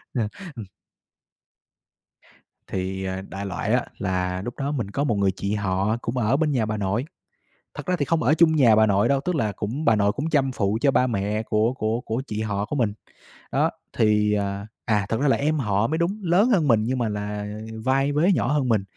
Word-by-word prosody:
À, 110 -4 0 0.3
ừm. 115 -4 -7 2.0
Thì, 95 0 -3
à, 95 0 -3
đại 100 +1 -5
loại 95 - -2
á, - - +1
là 90 0 -1
lúc 120 +4 -5
đó 140 +1 -2
mình 120 -9 -3
có 140 +7 -1
một 120 -7 +1
người 100 -1 +2
chị 100 +2 -3
họ 100 +1 0
cũng 120 - -3
ở 120 +1 +2
bên 150 0 +1
nhà 120 -5 +1
bà 110 0 -2
nội. 105 +4 -1 0.7
Thật - - -7
ra 180 -1 +1
thì 145 - +1
không 160 +3 0
ở 135 +6 +4
chung 160 -1 +4
nhà 120 -7 +6
bà 110 0 +5
nội 100 -1 +3
đâu, 140 -1 +2
tức 180 +5 -2
là 110 -9 0
cũng 115 +10 -4
bà 115 -6 +4
nội 100 0 +2
cũng 145 +8 -3
chăm 135 -4 +2
phụ 105 -2 0
cho 140 - +4
ba 130 - +3
mẹ 105 -2 -1
của 110 +1 +1
của 110 -2 -1
của 115 +2 -3
chị 105 -3 -4
họ 105 -2 -1
của 150 - -3
mình. 115 -6 +1 0.6
Đó. - - +2 0.3
Thì, 105 -1 +3
à 100 0 -2 0.2
à, 105 -4 +1
thật 115 +2 -1
ra 145 - +2
là 135 - +3
em 155 +2 0
họ 105 -3 +1
mới 160 - -1
đúng, 175 +6 -1
lớn 185 +7 +3
hơn 180 - +3
mình 115 -4 +4
nhưng 130 +4 -1
mà 120 -3 0
là 105 0 -4 0.4
vai 135 +2 +2
vế 155 +7 +3
nhỏ 145 - 0
hơn 140 -4 +1
mình. 110 -4 +2
110 Hz, 230 wpm, -24 LUFS, 105-140 Hz, 2.0 s, nhà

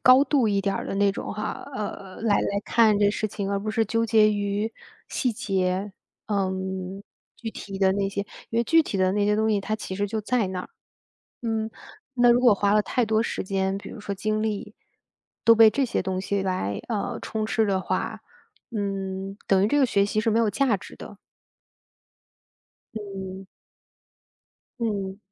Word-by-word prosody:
高 255 +2 +8
度 265 -4 +2
一 200 -1 +2
点 195 0 0
儿 - - -3
的 - - -3
那 200 0 +4
种 - - -5
哈， 210 - -4
呃， 200 -3 -5
来 215 -3 +3
来 200 0 -1
看 220 -3 +4
这 205 -1 +4
事 215 - -1
情， 200 -1 -4
而 200 - +1
不 215 +2 -3
是 225 0 +2
纠 230 +2 0
结 215 -1 +5
于 205 +2 -1 0.4
细 250 -3 0
节， 190 -1 -1 0.3
呃， 200 -3 0 0.9
具 225 - -5
体 195 -2 -7
的 190 -1 +4
那 195 0 0
些。 200 0 -3 0.3
因 230 - 0
为 235 - +2
具 325 +5 +5
体 200 - -4
的 185 0 +2
那 205 0 +1
些 210 0 +2
东 220 0 +2
西， 205 -2 +2
它 215 +2 -2
其 190 -3 -6
实 205 +1 0
就 220 +2 -2
在 220 -2 0
那 185 -1 -3
儿， - - -9 0.7
嗯， 225 -2 -1 0.4
那 245 -2 +5
如 240 - +4
果 245 -3 +6
花 200 +1 +2
了 210 - +5
太 245 - 0
多 220 0 +2
时 - - -2
间， 190 0 -1
比 200 - -9
如 225 - -9
说 205 -1 -4
精 215 +2 -1
力， 215 0 -3 0.7
都 230 0 +7
被 225 -1 +8
这 275 +5 0
些 - - -1
东 185 0 -2
西 200 0 -1
来， 100 - -1
呃， 215 -4 -2
充 215 -1 -2
斥 220 0 +1
的 190 -2 +1
话， - - -2 0.5
嗯， 195 -2 -3
等 195 -1 +4
于 205 - +4
这 290 - +2
个 270 - +5
学 200 -3 +2
习 215 +1 0
是 225 - +1
没 220 - +2
有 225 -2 +3
价 255 -3 +2
值 190 - -12
的。 205 - -10 1.8
嗯。 195 -2 -6 1.3
嗯。 200 -4 -2
205 Hz, 210 characters per minute, -25 LUFS, 195-220 Hz, 1.8 s, 高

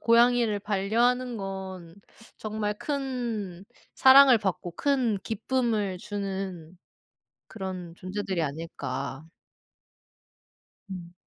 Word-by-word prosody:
고양이를 235 -2 +4
반려하는 230 +5 +1
건 190 -4 -6 0.4
정말 210 -1 -2
큰 240 - -3 0.3
사랑을 265 -2 +8
받고 190 -4 -2
큰 255 -7 +1
기쁨을 225 -4 -1
주는 190 -4 -5 0.7
그런 185 -4 -6
존재들이 185 -1 -3
아닐까. 140 -2 -5 1.6
음. 175 -2 -8
205 Hz, 175 characters per minute, -27 LUFS, 185-235 Hz, 1.6 s, 사랑을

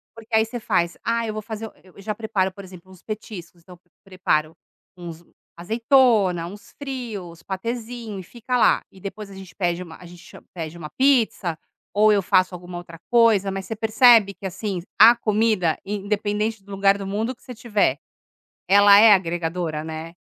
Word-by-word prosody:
Porque 225 0 -14
aí 220 0 +4
você 240 +2 -6
faz: 175 -6 0
"Ah 230 0 0
eu 215 - -3
vou 215 - -5
fazer 220 0 -6
o" - - -16
eu 185 - -20
eu - - -13
já 215 +2 -3
preparo, 210 -4 -1
por 200 +1 -12
exemplo, 185 0 -14
uns 185 - -16
petiscos, 190 -5 -8
então 180 0 -15 0.2
preparo 175 -5 -1 0.4
uns 170 -1 -9 0.3
azeitona, 220 -3 +2
uns 205 +3 -12
frios, 225 -11 -6
patêzinho 230 +1 -5
e - - -8
fica 245 +5 -3
lá. - - +4
E 190 - -17
depois 200 +2 -8
a 195 - -12
gente 190 -1 -12
pede 175 -1 -1
uma 160 -2 -12
a 180 - -14
gente 175 0 -14
cha - - -14
pede 165 -1 -6
uma 155 -3 -8
pizza, 230 - +2 0.4
ou 215 +1 +4
eu 200 -1 +3
faço 185 -1 +2
alguma 175 0 -9
outra 170 -1 -11
coisa, 225 -5 +4
mas 195 0 -5
você 225 - -5
percebe 220 -1 +5
que, 195 - -12
assim, 190 0 -4 0.2
a 230 +3 +9
comida, 215 -7 +1
independente 210 +1 -2
do 200 - -15
lugar 195 0 +3
do 195 - -6
mundo 220 +6 -3
que - - -28
você - - -11
estiver, 215 - 0 0.7
ela 200 +1 +7
é 220 -1 +8
agregadora, 170 -3 -1
né? 160 +1 -7
200 Hz, 190 wpm, -22 LUFS, 180-220 Hz, 0.7 s, a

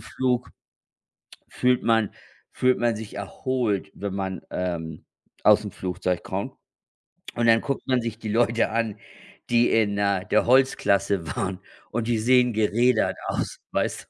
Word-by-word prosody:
Flug 125 -1 -1 1.0
fühlt 125 0 +1
man 115 -2 +2 0.4
fühlt 130 0 +2
man 120 -1 +1
sich 110 -1 -8
erholt, 105 0 -2
wenn 100 -1 -4
man, 95 -2 -3
ähm, 85 -3 -4 0.4
aus'm 105 -1 +4
Flugzeug 90 -1 -2
kommt. - - -4 0.8
Und 120 0 +1
dann 115 0 +6
guckt 140 -2 -3
man 130 -2 +2
sich 115 -2 -4
die 110 - -5
Leute 115 +1 +2
an, 110 -2 -1 0.5
die 120 0 +4
in, 105 -3 +2
äh, 100 -2 +1
der 110 - +3
Holzklasse 100 -8 +2
waren 95 0 -2 0.3
und 115 0 -2
die 120 -1 +1
sehen 125 +1 +4
gerädert 110 +2 +2
aus, - - -3
weißt - - -1
du. - - -27
110 Hz, 145 wpm, -25 LUFS, 100-120 Hz, 1.0 s, dann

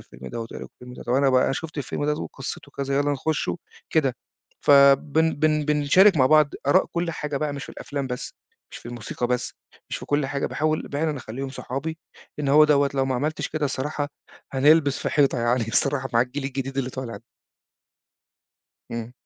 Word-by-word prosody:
الفيلم 65 +1 -9
دوّة 115 -1 -5
إيه - - -6
رأيكم - - -8
في - - -52
الفيلم 125 0 -10
ده، - - -9
طَب 120 - -2
أنا 135 +1 +4
بقى 130 +1 +3
شُفت 155 0 -6
الفيلم 145 +1 -3
ده 150 - +2
وقصته 140 -1 -7
كذا، 140 0 -2
يالّا 145 0 +2
نخشه؟" 155 +4 -1 0.3
كده. 140 -6 +2 0.4
فبن 145 +3 +5
بن 155 0 +1
بنتشارك 150 +6 +5
مع 130 -3 +5
بعض 155 0 +5 0.2
آراء 145 - +4
كل 170 0 -1
حاجة 150 -3 -4
بقى، 150 0 -1
مش 140 -1 -6
في - - -10
الأفلام 140 -1 -4
بس، 125 -1 -5 0.4
مش - - -7
في - - -13
الموسيقى 120 0 -4
بس، 125 0 -2 0.4
مش - - -2
في - - -9
كل 145 -1 +1
حاجة. 140 +1 -2
باحاول 155 0 -1
فعلًا 150 +1 0
أخلّيهم 130 +2 -6
صحابي، 140 +5 -5 0.4
لأن 145 -2 -1
هو 150 +2 +7
دوّة 145 -2 +3
لو 135 -1 +2
ما 130 - 0
عملتش 150 +5 -2
كده، 155 -1 -2
الصراحة 145 +1 -2 0.4
هنلبس 145 +1 +4
في - - -2
حيطة 140 -4 +2
يعني 120 -1 +1
الصراحة 130 +2 0
مع 115 - +5
الجيل 130 +3 -2
الجديد 135 0 -4
اللي 130 -1 -1
طالع. 125 -5 -6 1.7
امم. 115 +1 -5
140 Hz, 195 wpm, -24 LUFS, 130-150 Hz, 1.7 s, هو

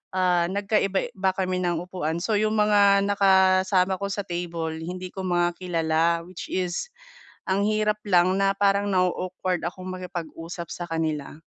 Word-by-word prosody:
ah, 180 -2 +2
nagkaiba-iba 195 -1 0
kami 185 -1 -1
ng 175 -1 -1
upuan. 170 -3 -3
So, 215 0 +1
yung 215 0 +1
mga 200 -1 +5
nakasama 190 -1 +3
ko 200 - -2
sa 205 +1 -2
table 170 -2 -4
hindi 180 +1 -6
ko 190 - -5
mga 175 -1 +1
kilala. 165 -3 0 0.2
Which 180 -1 -8
is 185 - -2 0.6
ang 200 +2 +2
hirap 215 0 +1
lang 185 0 +3
na 195 0 +2
parang 200 0 +2
na-o-awkward 185 -1 -1
akong 185 +1 -6
makipag-usap 170 -2 -6
sa 175 - -5
kanila. 160 -2 -3
185 Hz, 145 wpm, -25 LUFS, 175-195 Hz, 0.6 s, mga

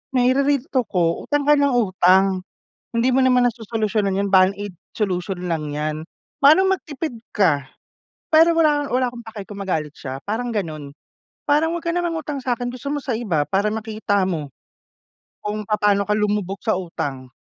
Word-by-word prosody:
Naire-real 265 +2 +3
talk 255 -4 +1
ko, 170 -2 0
"Utang 290 -1 +1
ka 295 +1 +5
nang 280 -3 +2
utang 190 -3 +3 0.5
hindi 230 +1 +1
mo 265 - +4
naman 250 -1 +4
nasosolusyonan 215 -4 -1
'yan, 200 - 0
band 185 0 +6
aid 205 -1 -6 0.2
solution 185 -3 -2
lang 160 -3 -2
'yan. 150 +1 -3 0.4
Manong 375 +7 +6
magtipid 305 -5 -6 0.2
ka." 145 -10 +1 0.6
Pero 325 +1 +6
wala 300 -3 +3
wala 255 0 +2
akong 240 -1 -11
paki 220 -2 -7
kung 205 - -8
magalit 160 -7 -2
siya, 135 -1 -6
parang 235 +4 -3
gano'n. 155 -8 -4 0.6
"Parang 305 +3 +3
wag - - -12
kang 335 +1 0
mangutang 320 -4 -3
sa'kin, 245 -1 -1
gusto 280 +3 -6
mo 295 - -1
sa 265 -3 -3
iba 175 -11 0
para 200 +2 +1
makita 215 -2 -1
mo 155 -6 -3 0.9
kung 210 +1 -3
papaano 205 -1 +2
ka 210 - -3
lumubog 205 -2 -1
sa 220 - +3
utang." 140 -7 -5
210 Hz, 165 wpm, -21 LUFS, 185-260 Hz, 0.9 s, band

